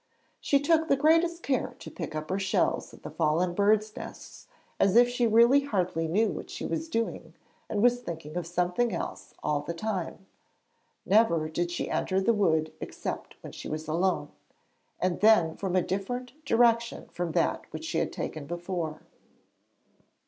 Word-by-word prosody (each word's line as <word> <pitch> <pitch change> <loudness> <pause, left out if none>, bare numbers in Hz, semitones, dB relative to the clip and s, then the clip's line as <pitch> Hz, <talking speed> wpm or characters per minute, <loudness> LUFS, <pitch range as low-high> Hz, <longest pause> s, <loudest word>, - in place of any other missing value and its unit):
She 280 - +2
took 320 +2 +2
the 275 - +4
greatest 330 +4 +3
care 260 -3 -1
to - - -10
pick 160 -3 -6
up 155 +2 -4
her 190 - 0
shells 195 0 0
and - - -16
the - - -7
fallen 165 +3 +1
birds' 215 +2 +2
nests - - -10 0.3
as 195 +1 +3
if 240 +1 +7
she 245 -1 +1
really 235 +5 +6
hardly 180 - -1
knew 210 +8 +2
what - - -6
she - - -6
was 320 0 -3
doing, 180 - -3 0.3
and 205 0 0
was 245 0 +4
thinking 160 -5 -7
of 175 -2 -3
something 180 +6 0
else - - -6
all 150 -1 +1
the 170 +3 -5
time. 190 -1 -4 0.8
Never 190 -7 +3
did 175 +2 -1
she 175 - -3
enter 190 0 0
the 230 +5 +3
wood 160 -7 +1
except - - -5
when - - -9 0.3
alone, 175 +4 0 0.7
and 180 -1 0
then 205 -7 +5
from 190 -2 -2
a 185 - +3
direction 245 - -4
different 235 -1 +2
from 175 -2 -3
that - - 0
which - - -6
she - - -1
had - - -1
taken 150 -3 -5
before. 170 -2 -4
190 Hz, 165 wpm, -28 LUFS, 170-235 Hz, 0.8 s, if